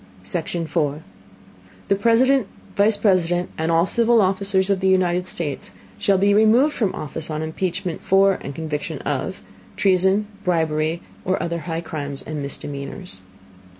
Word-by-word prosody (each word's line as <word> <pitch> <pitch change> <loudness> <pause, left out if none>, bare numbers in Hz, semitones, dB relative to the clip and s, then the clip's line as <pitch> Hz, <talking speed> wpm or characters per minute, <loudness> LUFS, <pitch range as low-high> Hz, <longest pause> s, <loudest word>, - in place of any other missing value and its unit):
Section 165 - -2
4. 150 -1 -1 0.8
The 200 - +3
President, 235 +3 +3 0.3
Vice 205 +1 +3
President 180 -4 +1
and 160 +1 -1
all 165 +1 +4
civil 235 +3 +3
Officers 195 0 +1
of 195 - +1
the 190 - +1
United 180 -1 +2
States, 150 -7 -4 0.3
shall 195 - +3
be 200 +2 +3
removed 225 +8 +5
from 205 -6 -1
Office 155 +2 -5
on 155 0 -3
Impeachment 175 +2 -3
for, 195 0 +3
and 140 - -7
Conviction 155 -2 -4
of, - - -3 0.3
Treason, 190 +2 +3 0.2
Bribery, 160 -2 0 0.2
or 185 +1 0
other 170 0 -2
high 165 0 -2
Crimes 145 -4 -5
and 155 -1 -5
Misdemeanors. 140 - -6
180 Hz, 145 wpm, -22 LUFS, 160-195 Hz, 0.8 s, removed